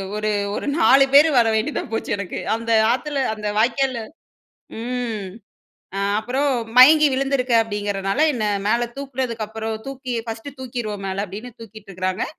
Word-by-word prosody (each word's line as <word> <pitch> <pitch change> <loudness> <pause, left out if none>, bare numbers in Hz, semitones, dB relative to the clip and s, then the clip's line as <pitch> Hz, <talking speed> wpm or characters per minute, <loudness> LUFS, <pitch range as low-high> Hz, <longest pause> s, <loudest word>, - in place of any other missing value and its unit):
ஒரு 215 0 -1 0.3
ஒரு - - -4
4 270 -3 +6
பேரு 295 +3 +8
வர 230 -1 +5
வேண்டியதா 230 +7 -1
போச்சு 225 - -3
எனக்கு. 200 -3 -5 0.2
அந்த 230 0 -4 0.2
ஆத்துல 275 +1 -1
அந்த 210 -1 -5
வாய்க்கால்ல 255 +2 +1 0.8
ம் 235 -4 -3 1.0
அப்புறம் 260 +6 -1 0.3
மயங்கி 300 +4 +8
விழுந்துருக்கேன் 260 -3 +2
அப்படிங்கிறனால, 205 0 -2
என்ன 220 -3 -2 0.2
மேல 240 +2 +1
தூக்கினதுக்கப்புறம் 230 -5 -4
தூக்கி 260 -2 -6
ஃபர்ஸ்ட்டு 230 +5 -7
தூக்கிருவோம் 235 -6 -5
மேல 195 +2 -2
அப்டின்னு 210 +6 -9
தூக்கிட்டுருக்காங்க. 195 -4 -5
235 Hz, 125 wpm, -21 LUFS, 215-265 Hz, 1.0 s, பேரு